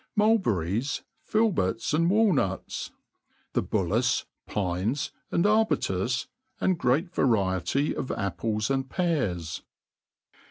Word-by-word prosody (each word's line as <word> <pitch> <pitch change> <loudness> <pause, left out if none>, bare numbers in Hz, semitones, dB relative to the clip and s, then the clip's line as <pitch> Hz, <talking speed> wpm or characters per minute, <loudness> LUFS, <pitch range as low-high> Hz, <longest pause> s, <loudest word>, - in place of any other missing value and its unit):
Mulberries, 135 - +1 0.2
filberts, 170 - +1
and 165 +2 +3
walnuts. 185 - +1 0.6
The - - +2
bul - - 0
laeV, - - +1 0.2
pines, 100 +7 -1 0.2
and 170 - +1
arbutas; 125 - +2 0.3
and 185 - +2
great 160 +8 +1
variety 100 - +1
of 130 - -4
apples 105 +5 -1
and 135 0 -1
pears. 120 - -1
130 Hz, 95 wpm, -27 LUFS, -, 0.6 s, and